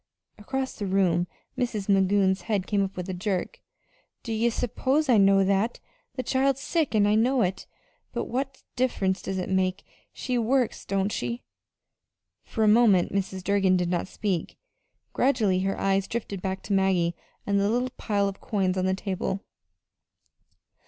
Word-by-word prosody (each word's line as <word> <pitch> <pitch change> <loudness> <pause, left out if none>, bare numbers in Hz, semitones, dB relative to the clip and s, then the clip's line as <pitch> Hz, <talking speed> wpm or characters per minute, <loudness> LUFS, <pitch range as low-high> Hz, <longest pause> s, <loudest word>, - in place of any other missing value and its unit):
Across 265 +4 -4
the 205 - -2
room 180 -2 +2 0.3
Mrs. 220 -5 -2
Magoon's 195 -1 +3
head 195 0 -1
came 200 -1 +1
up 195 0 -4
with 180 0 -4
a 190 - -3
jerk. 185 0 -3 0.6
"Don't 225 -2 -3
ye 230 +2 +2
s'pose 260 +6 0
I 230 -4 +6
know 195 0 +5
that? 200 +4 +1 0.4
The 255 - -2
child's 270 +1 +1
sick, 315 -8 0
an' 205 -1 +4
I 205 - +3
know 245 +4 +3
it. 185 0 -3 0.4
But - - -3
what 265 +2 -4
diff'rence 205 -7 0
does 190 -1 -3
that 185 - -2
make? 190 0 0 0.3
She 250 -1 -2
works, 245 +1 0
don't 195 +1 0
she?" 235 +3 -3 1.0
For 220 - -2
a - - +4
moment 210 -6 +4
Mrs. 190 -1 -2
Durgin 195 -1 +3
did 175 -1 -1
not 175 +1 -1
speak. 190 -4 -3 0.6
Gradually 215 -8 +2
her 195 +1 -1
eyes 195 0 +1
drifted 205 -5 -4
back 190 0 -3
to 200 - -2
Maggie 185 -3 +2 0.3
and 200 0 +2
the 200 +1 +2
little 245 +3 0
pile 200 -2 0
of 195 0 -6
coins 190 -3 0
on 185 - 0
the 190 - +1
table. 195 0 -3
200 Hz, 165 wpm, -26 LUFS, 190-235 Hz, 1.0 s, I